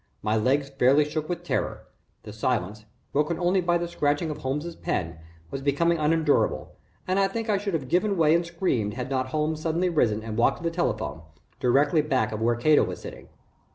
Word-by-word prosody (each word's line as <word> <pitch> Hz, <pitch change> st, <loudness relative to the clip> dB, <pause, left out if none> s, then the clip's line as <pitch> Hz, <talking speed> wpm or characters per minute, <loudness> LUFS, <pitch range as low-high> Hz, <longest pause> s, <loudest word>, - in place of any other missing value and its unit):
My 105 Hz, +1 st, +1 dB
legs 135 Hz, +6 st, +1 dB
fairly 135 Hz, +2 st, +3 dB
shook 155 Hz, +1 st, -4 dB
with 175 Hz, -1 st, -3 dB
terror. 175 Hz, -, -2 dB, 0.4 s
The 105 Hz, -, -9 dB
silence, 110 Hz, -2 st, -2 dB, 0.3 s
broken 150 Hz, +3 st, +1 dB
only 180 Hz, +2 st, +2 dB
by 175 Hz, 0 st, +2 dB
the 175 Hz, 0 st, -3 dB
scratching 150 Hz, -1 st, 0 dB
of 150 Hz, -, -6 dB
Holmes's 150 Hz, +6 st, -3 dB
pen, 80 Hz, -1 st, -3 dB, 0.3 s
was 135 Hz, -, -4 dB
becoming 165 Hz, +5 st, +1 dB
unendurable 155 Hz, -1 st, +1 dB, 0.4 s
and 185 Hz, +1 st, +1 dB
I 195 Hz, -, +4 dB
think 225 Hz, +3 st, -4 dB
I 200 Hz, -, +2 dB
should 200 Hz, -3 st, -2 dB
have 135 Hz, -5 st, -3 dB
given 190 Hz, +6 st, +1 dB
way 160 Hz, -2 st, +4 dB
and 170 Hz, +1 st, +3 dB
screamed 165 Hz, -, -1 dB
had 125 Hz, +1 st, -5 dB
not 130 Hz, -1 st, 0 dB
Holmes 155 Hz, +3 st, -1 dB
suddenly 170 Hz, +3 st, 0 dB
risen 110 Hz, -10 st, +1 dB
and 110 Hz, -1 st, -5 dB
walked 135 Hz, +3 st, +3 dB
to -, -, -12 dB
the 165 Hz, -, 0 dB
telephone, 110 Hz, -, -2 dB, 0.4 s
directly 145 Hz, +5 st, +3 dB
back 130 Hz, -7 st, 0 dB
of 110 Hz, 0 st, -4 dB
where 120 Hz, +1 st, +2 dB
Cato 150 Hz, +6 st, +4 dB
was 90 Hz, -3 st, -4 dB
sitting. -, -, -10 dB
150 Hz, 200 wpm, -26 LUFS, 125-170 Hz, 0.4 s, I